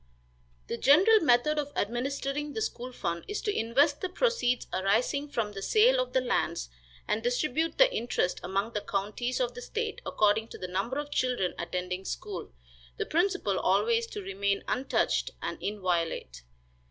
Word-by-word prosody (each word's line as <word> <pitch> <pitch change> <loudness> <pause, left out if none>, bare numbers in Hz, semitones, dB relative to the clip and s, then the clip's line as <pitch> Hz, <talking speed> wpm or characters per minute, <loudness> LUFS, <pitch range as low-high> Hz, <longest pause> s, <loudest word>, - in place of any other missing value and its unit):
The 235 - -4
general 370 - +6
method 300 0 +3
of 290 -1 -3
administering 275 +6 -2
the 440 - -3
school 250 - -4
fund 170 -8 -3
is 415 - -3
to 415 - -1
invest 280 +6 +2
the 370 - -2
proceeds 370 - +1
arising 230 +10 +1
from 225 -6 -1
the 195 -1 -7
sale 470 - +4
of - - -1
the 260 - +3
lands, 170 - -1 0.4
and 220 - 0
distribute 280 +6 0
the - - +6
interest 230 -6 0
among 195 +5 -2
the 210 - -1
counties 210 +6 -2
of 245 -1 0
the 245 - -8
state 455 - -3
according 215 +1 +2
to - - -10
the 185 - -5
number 195 +9 -2
of 290 0 -4
children 250 -10 0
attending 180 +2 -3
school; 190 - -5 0.5
the - - -1
principal 345 - +1
always 225 +4 +2
to 205 - -7
remain 200 +1 -1
untouched 265 +2 +1
and - - -5
inviolate. 170 - -2
240 Hz, 165 wpm, -29 LUFS, 200-295 Hz, 0.5 s, general